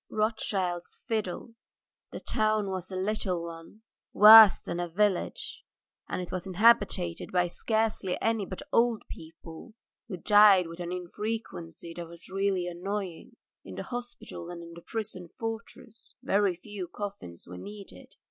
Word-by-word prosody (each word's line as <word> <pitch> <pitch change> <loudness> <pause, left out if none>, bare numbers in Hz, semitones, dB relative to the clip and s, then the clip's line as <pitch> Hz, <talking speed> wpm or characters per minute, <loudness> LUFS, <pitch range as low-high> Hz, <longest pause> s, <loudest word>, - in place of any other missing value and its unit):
ROTHSCHILD'S 195 -5 -2
FIDDLE 220 +1 -3 0.6
THE - - -6
town 215 -2 0
was 185 -1 -5
a 190 - -6
little 185 -2 -1
one, 165 +6 -11 0.3
worse 215 -1 +10
than 170 - -4
a 175 -1 -3
village, 195 +1 -1 0.5
and - - -2
it 175 - -9
was 185 0 -4
inhabited 190 -3 +2
by 180 -1 +2
scarcely 220 +1 -1
any 225 -2 0
but 185 - -7
old 230 -1 +3
people 160 +6 -11 0.3
who 195 -5 -5
died 205 -1 +6
with 165 +1 -9
an 175 0 -4
infrequency 180 -2 -5
that 170 0 -7
was 170 +1 -12
really 195 -2 0
annoying. 180 0 -5 0.3
In - - -10
the - - -5
hospital 245 -8 -7
and 170 -1 -8
in 170 - -11
the 170 - -11
prison 200 -5 -6
fortress 225 0 -8
very 200 -2 +2
few 195 0 -7
coffins 195 - -7
were 90 +1 -9
needed. 205 - -11
190 Hz, 145 wpm, -28 LUFS, 175-215 Hz, 0.6 s, worse